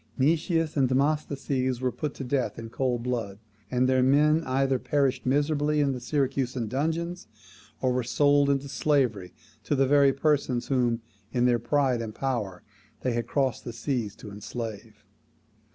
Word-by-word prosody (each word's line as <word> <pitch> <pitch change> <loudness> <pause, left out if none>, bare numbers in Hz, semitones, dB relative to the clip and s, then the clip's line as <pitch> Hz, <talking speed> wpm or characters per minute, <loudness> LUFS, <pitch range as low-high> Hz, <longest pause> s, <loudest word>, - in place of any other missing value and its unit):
Nicias 160 +3 +1
and 135 -4 +2
Demosthenes 135 -2 0
were 130 0 0
put 150 +2 -4
to - - -6
death 130 0 -1
in 115 -1 -8
cold 125 -2 -1
blood; 115 -6 -3 0.3
and 125 0 +2
their 130 0 +3
men 150 +5 +4
either 135 0 +1
perished 135 -3 0
miserably 145 +2 +1
in 140 -2 +2
the 130 - -4
Syracusan 130 -2 -1
dungeons, 165 +6 -2 0.6
or 130 -1 +2
were 125 - +1
sold 145 +4 +3
into 140 0 0
slavery 130 -10 0 0.3
to 145 - 0
the 135 0 +3
very 140 0 +5
persons 135 -3 0
whom, 120 -3 +1 0.3
in 125 -1 +1
their 120 -1 +3
pride 130 0 +1
of 110 -2 -6
power, 110 -9 -3 0.4
they 125 - 0
had 120 -1 -2
crossed 135 -4 0
the 120 - -6
seas 115 -3 -2
to 105 - -10
enslave. 105 0 -7
130 Hz, 160 wpm, -27 LUFS, 120-145 Hz, 0.6 s, very